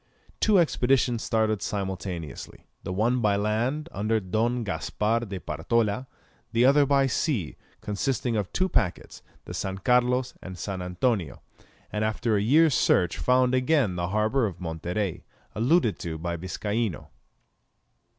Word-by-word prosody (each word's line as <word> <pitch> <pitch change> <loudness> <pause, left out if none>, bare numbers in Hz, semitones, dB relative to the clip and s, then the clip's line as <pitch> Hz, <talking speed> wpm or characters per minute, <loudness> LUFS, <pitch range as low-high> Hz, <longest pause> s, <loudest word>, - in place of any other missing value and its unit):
Two 215 -3 +4
expeditions 125 -7 +2
started 110 -2 0
simultaneously, 95 - -5 0.2
the - - -5
one 115 +6 +1
by 105 -2 +3
land, 115 +9 -1
under 110 +2 0
Don 115 +5 -1
Gaspar 105 +2 -1
de 95 -1 -5
Partola, 115 +8 -1 0.4
the 115 +1 +3
other 140 +1 +5
by 140 -1 +4
sea, 125 - -1 0.3
consisting 120 +3 -1
of 105 -4 -2
two 185 - +1
packets, 90 - -2 0.2
the - - -7
San 95 0 -3
Carlos 125 +3 +2
and 95 -1 -8
San 95 +1 -4
Antonio, 90 - -1 0.5
and 105 0 -1
after 110 +1 0
a 100 - +2
year's 150 +7 +4
search 90 -6 +2
found 125 0 +3
again 130 - +2
the 85 0 -2
harbour 110 +5 +1
of 90 -3 -8
Monterey, 90 +3 -3 0.3
alluded 120 - +2
to 80 -2 -4
by 85 +2 -3
Viscaino. 100 +2 -3
110 Hz, 140 wpm, -26 LUFS, 95-125 Hz, 0.5 s, other